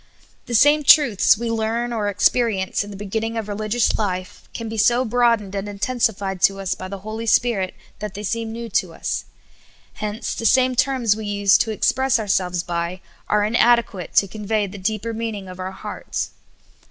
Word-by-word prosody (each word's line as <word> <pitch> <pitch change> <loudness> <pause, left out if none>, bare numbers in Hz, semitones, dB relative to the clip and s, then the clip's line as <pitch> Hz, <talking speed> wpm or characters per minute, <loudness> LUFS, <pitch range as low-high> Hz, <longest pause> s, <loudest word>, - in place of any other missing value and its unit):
THE 240 - -2
same 290 +5 +5
truths 280 - +6
we 230 +1 -3
learn 230 +2 -1
or 215 -3 -1
experience 205 -1 +1
in 205 - -10
the 200 - -8
be 205 - -7
ginning 225 +3 -2
of 220 -2 -3
religious 215 +3 0
life 185 -3 -4
can 230 - -6
be 225 - -5
so 240 +4 +3
broadened 230 -4 +1
and 200 +1 -3
intensified 200 -3 -1
to 195 0 +3
us 190 -1 -1
by 185 0 -7
the 200 +1 -6
Holy 220 +1 -5
Spirit 215 -4 +2 0.2
that 210 -2 -6
they 205 - -6
seem 225 +2 -2
new 230 +1 -6
to 185 -4 -1
us; - - -3 0.8
hence 210 +1 -3
the - - -6
same 255 +1 +4
terms 255 -4 +2
we 215 -1 -6
used 200 -1 +3
to 225 - -1
express 265 +4 +2
our 220 - -3
selves 180 -2 0
by 170 +1 -3 0.3
are 210 0 +3
inadequate 225 -4 +2
to 200 - +5
conve}^ 210 0 -2
the 200 - -9
deeper 215 +3 -2
mean 225 -1 -3
ing 195 -2 -8
of 185 0 -10
our 185 0 -3
hearts. 190 - -5
215 Hz, 190 wpm, -21 LUFS, 195-230 Hz, 0.8 s, truths